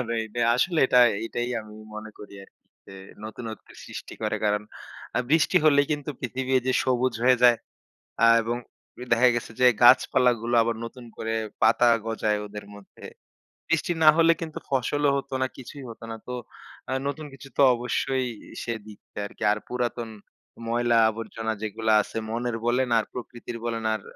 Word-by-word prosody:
আপনার 125 - -3 0.2
এইটা 110 +2 -5 0.2
আসলে 170 +6 +1
এটা 125 - +4 0.3
এটাই 120 +1 -3
আমি 105 -1 -13 0.2
মনে 110 0 -7
করি 105 - -11
আরকি। - - -28 0.2
যে - - -12 0.3
নতুনত্বের 110 +1 -8
সৃষ্টি - - -9
করে। - - 0
কারণ 105 0 +1 0.5
আ - - +3
বৃষ্টি 160 +3 +3
হলেই 145 -2 +5
কিন্তু 145 0 -3
পৃথিবী 130 0 -4
এই - - -5
যে - - +3
সবুজ 130 -1 +1
হয়ে 130 0 +6
যায়। 120 -1 +7 0.7
আ - - +7 0.2
এবং 115 +2 -2 0.5
এ - - -4
দেখা 120 +2 +5
গেছে 120 - -3
যে 125 - +6 0.2
গাছপালাগুলো 120 -1 +4
আবার 115 0 -1
নতুন 120 +1 -9
করে 110 - -3 0.3
পাতা 115 +2 +5 0.2
গজায় 110 -2 0
ওদের 105 0 -9
মধ্যে। 100 -1 -15 0.6
বৃষ্টি 165 +1 0
না 155 - +9
হলে 165 0 +6
কিন্তু 160 -2 -6
ফসলও 140 +2 +1
হত 140 - -5
না, 130 - +2
কিছুই 135 +2 -10
হতো 115 - -11
না। - - -4
তো - - -5 0.6
আ - - -3 0.2
নতুন 150 +2 -4
কিছু 135 +1 -12
তো - - +4
অবশ্যই 130 +2 -1 0.4
সে 115 - -2
দিচ্ছে 105 -1 -15
আরকি। 100 - -9
আর 105 - 0
পুরাতন 120 -2 -3 0.6
ময়লা 120 0 +2
আবর্জনা 110 0 -4
যেগুলো 110 +1 -1
আছে 105 - -7
মনের 120 +1 -2
বলেন, 125 +1 +1
আর 110 - +1
প্রকৃতির 120 -1 -7
বলেন, 115 -1 -2
আর 110 - -3
120 Hz, 170 wpm, -25 LUFS, 110-130 Hz, 0.7 s, না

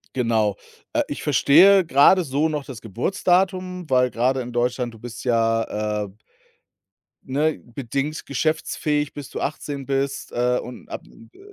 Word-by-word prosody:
Genau, 110 -5 +1 0.4
äh, - - +2
ich - - -5
verstehe 185 +6 +6
grade 165 +6 +5
so 145 +2 0
noch 150 -2 -3
das 130 -5 -9
Geburtsdatum, 180 - 0
weil 125 -1 +3
grade 130 +4 +1
in 125 -1 -6
Deutschland, 120 0 -1
du - - -13
bist 120 +1 -9
ja, 115 -3 0
äh - - -13 1.1
ne, 150 +4 0 0.2
bedingt 140 +4 -3
geschäftsfähig, 150 0 -1
bis 145 -3 -8
du - - -6
18 140 -1 -4
bist, 135 0 -2
äh, 125 +1 +1
und 125 - -9
ab, - - -6
äh 110 - -18
135 Hz, 145 wpm, -23 LUFS, 120-155 Hz, 1.1 s, verstehe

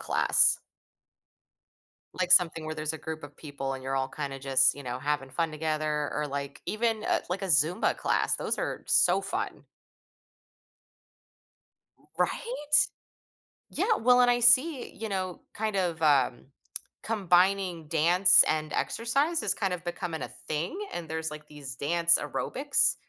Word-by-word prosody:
class? - - +3 1.6
Like, 180 -1 -2
something 165 -3 +6
where 155 0 -6
there's 155 0 -3
a 160 - -8
group 160 -1 -8
of 145 0 -15
people 140 -3 -7
and 130 - -10
you're 135 +1 -4
all 130 0 -2
kinda 140 -2 -7
just, 130 -1 +3
you 145 - -11
know, 125 0 -6
having 145 -2 -4
fun 165 +3 -3
together 155 -1 -3
or, 150 0 -3
like 140 0 -7
even, 220 0 -3
uh, - - -1
like 180 +3 -5
a - - -3
Zumba 165 - +2
class, - - 0
those - - -2
are - - -5
so - - +3
fun. - - -6 2.3
R - - -29
right? 470 -10 -4 1.1
Yeah, 450 - 0
well, 250 +2 +3
and 245 0 +3
I 245 - 0
see, 255 +4 +7
you 220 0 -7
know, 185 -2 -5
kind 215 -1 -4
of, 175 -3 -3
um, 135 -5 0 0.6
combining 185 -4 -1
dance 175 +5 +6
and 155 -1 -3
exercise 280 +9 -1
is - - +1
kind 195 -4 -3
of 180 -1 -7
becoming 175 -2 -6
a - - -6 0.2
thing, 155 - -4 0.2
and 170 -2 -7
there's 160 0 -4
like 150 0 -11
these 140 -3 -8
dance 170 +4 +3
aerobics 280 +2 +2
165 Hz, 155 wpm, -26 LUFS, 150-200 Hz, 2.3 s, see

